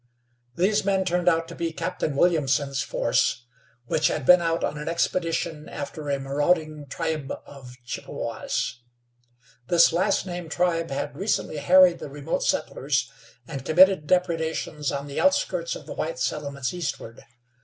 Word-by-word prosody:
These 200 +4 +2
men 195 -1 +1
turned 180 0 +2
out 165 -1 +1
to - - -8
be 170 -1 -3
Captain 160 -3 -3
Williamson's 140 -4 +2
force, 120 - 0 0.4
which 150 +5 +2
had - - -2
been 180 +3 +7
out 165 0 0
on 150 - -2
an 150 - -6
expedition 165 -2 -1
after 145 +1 -6
a 140 -1 0
marauding 150 +2 0
tribe 155 -3 -3
of 130 -3 -12
Chippewas. 120 0 -4 0.9
This 170 +1 +5
last 190 +4 +1
named 175 -2 -6
tribe 165 0 0
had 140 +1 -4
recently 190 -3 -1
harried 175 +3 +6
the - - -7
remote 145 +3 -3
settlers, - - 0 0.4
and 135 -4 -6
committed 180 0 +5
depredations 160 -4 0
on 140 0 -3
the 140 -1 -4
outskirts 190 -12 +1
of - - -10
the - - -7
white 160 -3 -3
settlements 140 +2 -2
eastward. 150 -9 -5
160 Hz, 145 wpm, -25 LUFS, 140-175 Hz, 0.9 s, been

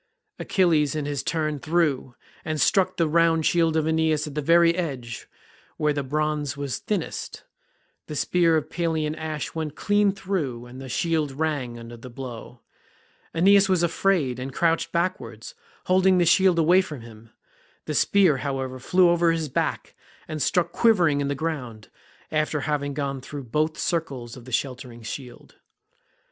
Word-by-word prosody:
Achilles 160 -7 +2
in 150 -2 -2
his 145 -2 -2
turn 155 -3 -2
threw, 155 -6 0 0.3
and 155 -1 -3
struck 190 +5 +2
the 165 - +2
round 165 0 +3
shield 165 -2 +2
of 155 - +1
Aeneas 160 -1 +1
at 150 - -7
the 150 - -2
very 170 +3 +5
edge, 135 -10 -4 0.5
where 150 -1 +1
the 145 - -1
bronze 150 0 -2
was 140 -2 -3
thinnest; 200 -6 -4 0.6
the 150 - -6
spear 165 +1 +2
of 155 - -2
Pelian 160 -3 -1
ash 155 -2 -4
went 155 -2 -4
clean 205 -1 +2
through, 175 -12 -3
and 125 +2 -10
the 135 - -8
shield 160 +1 0
rang 135 -5 -2
under 115 0 -9
the 120 +2 -11
blow; 120 -1 -9 0.7
Aeneas 195 +3 +5
was 180 -2 +2
afraid, 165 -7 +1
and 130 +2 -5
crouched 165 -1 +1
backwards, 180 - -3 0.3
holding 185 0 +4
the 175 - +3
shield 185 +1 +4
away 175 +3 +5
from 150 -9 -8
him; 115 -1 -14 0.6
the - - -3
spear, 185 -8 +4
however, 130 -1 -3
flew 180 +7 +4
over 170 -1 +3
his 165 -2 -2
back, 130 - -2 0.3
and 155 -1 -4
stuck 170 +4 +1
quivering 175 -12 +3
in 140 - -1
the 140 - -1
ground, 130 -8 -5 0.4
after 155 -1 0
having 145 -1 -2
gone 140 -2 -3
through 140 +1 -7
both 155 +6 -1
circles 135 -9 -3
of 125 -3 -12
the 130 - -10
sheltering 125 -2 -3
shield. 120 +2 -9
155 Hz, 160 wpm, -25 LUFS, 135-170 Hz, 0.7 s, very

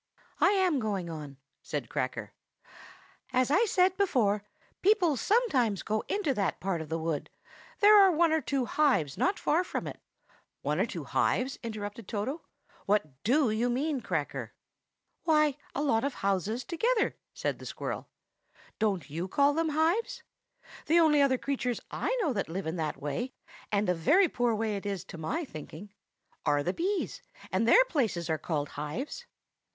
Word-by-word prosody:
"I - - +5
am 370 -7 +2
going 195 -7 -2
on," 150 -4 -8 0.2
said - - -4
Cracker. - - -3 1.0
"As 255 +1 +2
I 395 +9 +4
said 370 -2 +3
before, 225 - +2 0.4
people 370 -6 +4
sometimes 260 - +1
go 215 0 -1
into 400 -9 0
that 200 -6 -1
part 185 -3 -1
of 155 - -8
the 165 - -1
wood; 160 -2 -3 0.5
there 420 +1 +8
are 385 -1 +7
one 335 0 +3
or 320 0 +2
two 275 -4 -1
hives 250 - +2
not 390 +2 +1
far 330 +4 +2
from - - -4
it." - - -7 0.6
"One - - 0
or - - +2
two - - -5
hives?" 260 +2 0
interrupted 215 -2 -6
Toto. 235 +9 -3 0.5
"What 155 -10 0
do 255 +1 +3
you 230 +3 +1
mean, 275 +2 -1
Cracker?" - - -3 0.7
"Why, 305 -3 +3 0.2
a 290 - 0
lot 225 -6 +2
of 280 -2 -1
houses 200 +5 -1
together," 450 +7 +1 0.2
said - - -3
the - - -10
squirrel. - - -5 0.7
"Don't 195 -9 0
you 165 +5 -4
call 280 +8 +3
them 325 +1 0
hives? 400 +11 0 0.6
The 335 +3 +5
only 305 -3 +5
other 270 -2 +4
creatures 250 -3 -2
I - - -1
know 300 -7 +1
that 200 -7 -2
live 190 +4 -4
in 160 +2 -2
that 155 -2 -2
kind - - -22
of - - -19
way 150 - -3 0.4
(and 205 0 +1
a 180 - +3
very 310 - +4
poor 240 -6 0
way 215 -1 -1
it 200 - -8
is, 195 -3 -3
to 170 - -10
my 305 - -2
thinking) 175 - -10 0.5
are 145 -1 +2
the 180 - -1
bees, 375 - -2 0.3
and 225 - +1
their - - +7
places 215 - -1
are 155 - 0
called 150 -4 -2
hives." 210 - -5
245 Hz, 175 wpm, -29 LUFS, 190-320 Hz, 1.0 s, there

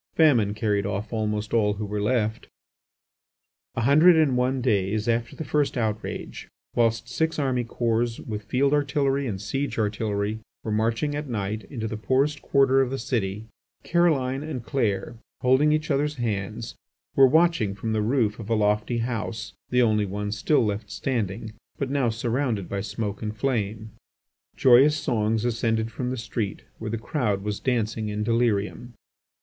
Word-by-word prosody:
Famine 120 -11 +4
carried 105 -2 0
off 105 +3 -4
almost 105 -1 -2
all 105 -3 +3
who 105 +1 -4
were 105 0 -3
left. 110 -1 0 1.3
A - - -1
hundred 155 +8 +6
and 155 -5 +3
one 130 +1 +1
days 105 -3 0
after 115 0 0
the - - -5
first 145 0 0
outrage, 110 -2 -3 0.3
whilst 115 0 +2
six 160 +7 -1
army 130 -4 0
corps 115 0 -1
with 105 -2 -6
field 135 +6 +2
artillery 140 -1 +1
and 100 -5 -3
siege 135 +8 -3
artillery 105 0 -1 0.2
were 110 - -3
marching, 115 +7 0
at 145 -1 -4
night, 105 -1 -3
into 115 -5 -4
the 110 - -4
poorest 135 +6 +1
quarter 135 -1 +4
of 130 - +1
the 135 - -3
city, 110 -5 -2 0.4
Caroline 140 -6 +2
and 150 -6 -5
Clair, 115 -3 -1 0.3
holding 130 +4 +4
each 155 0 0
other's 145 +2 +1
hands, 110 -2 -3 0.4
were 135 -1 +8
watching 160 - +3
from 110 +2 -3
the 110 - +1
roof 110 -2 +1
a 115 +1 -2
lofty 105 +2 +1
house, 115 -3 -3 0.2
the 125 0 +3
only 105 -3 +2
one 105 +2 -3
still 115 +5 +2
left 105 0 -3
standing, 110 -3 -3 0.2
but 135 -1 -2
now 135 -4 +2
surrounded 115 -3 -1
by 100 -1 -3
smoke 105 -1 -4
and 110 -1 -4
flame, 110 -4 -2 0.6
joyous 135 +4 +6
songs 110 -4 0
ascended 115 -1 0
from 125 +1 -3
the 130 - -3
street, 110 -2 -4 0.2
where 110 - -4
the 115 - -2
crowd 110 -5 -1
was 105 -1 -3
dancing 110 -3 -1
in 105 0 -2
delirium. 115 +1 0
115 Hz, 160 wpm, -25 LUFS, 105-130 Hz, 1.3 s, were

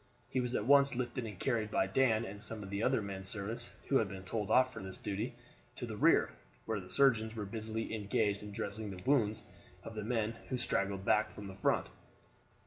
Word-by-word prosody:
He 130 - 0
was 125 0 -1
at 105 - 0
once 140 0 +6
lifted 120 -1 -2
and 105 -4 -8
carried 110 -1 0
by 95 - +2
Dan 115 +2 +2
and 100 0 -6
some 110 -1 0
of 95 - -8
the 100 +1 -1
other 125 -1 +2
men 95 -1 -5
servants, 110 +4 -2 0.2
who 135 - +4
had 110 - +2
been 95 -1 -7
told 105 +2 -3
off 130 0 +4
for 110 - -7
this 95 0 -7
duty, 105 +4 -3 0.4
to 125 - -4
the 110 -2 -5
rear, - - +4 0.3
where 110 -2 -1
the 90 -1 -10
surgeons 115 -3 +3
were 105 -2 -3
busily 110 +2 -3
engaged 105 -1 0
in 105 0 -8
dressing 100 +1 -4
the 90 -2 -8
wounds 110 -6 +2 0.4
of 115 - -7
the 110 -1 -4
men 110 -1 0 0.2
who 130 - 0
straggled 100 -4 0
back 110 +1 +3
from 105 - -9
the 95 -1 -8
front. 95 - +2
110 Hz, 220 wpm, -34 LUFS, 100-120 Hz, 0.4 s, once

